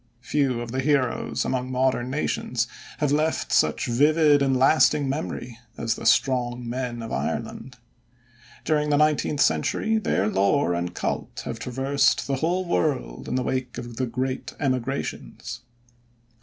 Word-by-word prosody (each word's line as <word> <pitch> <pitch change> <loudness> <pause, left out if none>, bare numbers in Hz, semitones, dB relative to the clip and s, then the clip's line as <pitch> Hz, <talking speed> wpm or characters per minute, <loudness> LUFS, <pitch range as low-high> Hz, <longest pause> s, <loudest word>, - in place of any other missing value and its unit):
Few 135 -3 0
of 120 -1 -6
the 130 - -2
heroes 135 -3 0
among 130 0 -2
modern 130 -1 +1
nations 125 -3 -1 0.3
have 150 -2 0
left 155 +2 0
such 75 - +2
vivid 145 +4 +4
and 135 -1 +2
lasting 140 +1 +4
memory 130 -4 -4 0.2
as 115 -1 0
"the - - -3
strong 125 -2 +2
men 120 -1 -3
of 115 - -7
Ireland." 125 -1 -4 0.9
During 150 -1 +1
the 145 - +3
nineteenth 150 -1 +2
century 220 0 +2
their 100 - 0
lore 100 +2 +2
and 85 +1 -3
cult - - -3
have - - -5
traversed 135 +2 +1
the 135 -1 -1
whole 175 +6 0
world - - -1
in - - -2
the 130 - 0
wake 130 -1 -3
of 120 -2 -7
the 130 - 0
great 130 +2 -3
emigrations. 135 0 -3
130 Hz, 145 wpm, -25 LUFS, 120-145 Hz, 0.9 s, vivid